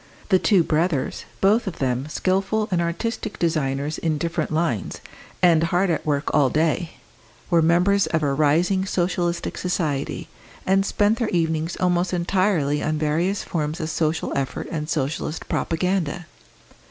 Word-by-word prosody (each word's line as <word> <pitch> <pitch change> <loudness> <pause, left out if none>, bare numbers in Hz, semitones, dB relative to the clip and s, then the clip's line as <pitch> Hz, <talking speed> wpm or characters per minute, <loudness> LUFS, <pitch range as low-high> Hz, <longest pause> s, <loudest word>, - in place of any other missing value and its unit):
The 190 -3 +5
two 190 -4 +4
brothers, 160 -3 -1 0.2
both 210 +3 +3
of 180 - -4
them 130 +1 -1
skilful 195 +6 0
and 175 -2 +2
artistic 210 +6 -3
designers 150 -3 -1
in 160 -2 0
different 165 +1 -2
lines, 155 - -1 0.5
and 165 -2 +5
hard 175 +2 +1
at 160 - -2
work 145 -1 0
all 145 -3 +4
day, 160 +3 0 0.6
were 170 -1 +5
members 180 +5 +3
of 160 -2 0
a 140 -2 +1
rising 170 +7 +2
Socialist 175 -1 -1
society, 155 -6 -2 0.4
and 195 +1 +2
spent 210 +2 +2
their 230 -3 0
evenings 160 -1 -1
almost 180 0 +1
entirely 175 -5 +1
on 155 0 -1
various 165 +6 0
forms 155 -1 -3
of 155 0 -3
social 160 0 -1
effort 135 -1 -3
and 155 -1 -3
Socialist 155 +2 -2
propaganda. 175 -1 -1
170 Hz, 145 wpm, -23 LUFS, 155-185 Hz, 0.6 s, The